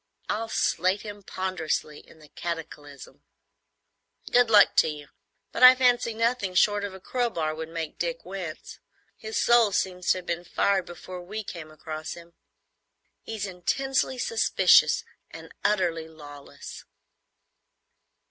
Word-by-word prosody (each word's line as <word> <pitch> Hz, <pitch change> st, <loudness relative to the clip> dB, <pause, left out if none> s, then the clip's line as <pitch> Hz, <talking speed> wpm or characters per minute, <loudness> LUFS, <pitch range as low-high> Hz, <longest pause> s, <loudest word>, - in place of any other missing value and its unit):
I'll 225 Hz, +2 st, -2 dB
slate 185 Hz, +1 st, 0 dB
him 205 Hz, -1 st, -8 dB
ponderously 185 Hz, -6 st, -3 dB
in -, -, -19 dB
the 155 Hz, -2 st, -17 dB
Cataclysm." 150 Hz, -4 st, -8 dB, 1.1 s
"Good 245 Hz, -1 st, +4 dB
luck 210 Hz, -2 st, +6 dB
to -, -, +6 dB
you; 150 Hz, -2 st, -7 dB, 0.4 s
but -, -, -5 dB
I 255 Hz, 0 st, +10 dB
fancy 245 Hz, -3 st, +2 dB
nothing 230 Hz, -5 st, 0 dB
short 205 Hz, +2 st, +3 dB
of 200 Hz, -2 st, -5 dB
a -, -, -10 dB
crowbar 190 Hz, -9 st, -2 dB
would 160 Hz, +1 st, -6 dB
make 165 Hz, -2 st, -6 dB
Dick 170 Hz, -1 st, -3 dB
wince. 180 Hz, -4 st, -7 dB, 0.4 s
His 220 Hz, 0 st, -4 dB
soul 235 Hz, -3 st, +4 dB
seems 180 Hz, -1 st, -2 dB
to -, -, +2 dB
have 180 Hz, -, -8 dB
been 170 Hz, 0 st, -3 dB
fired 190 Hz, +1 st, 0 dB
before 180 Hz, +1 st, -9 dB
we 210 Hz, +5 st, -6 dB
came 170 Hz, -5 st, -8 dB
across 155 Hz, 0 st, -7 dB
him. 170 Hz, 0 st, -14 dB, 0.9 s
He's 220 Hz, -3 st, -5 dB
intensely 260 Hz, -, -1 dB
suspicious 455 Hz, -, +4 dB, 0.3 s
and -, -, -11 dB
utterly 175 Hz, -6 st, 0 dB
lawless." 145 Hz, -3 st, -11 dB
185 Hz, 135 wpm, -26 LUFS, 160-220 Hz, 1.1 s, I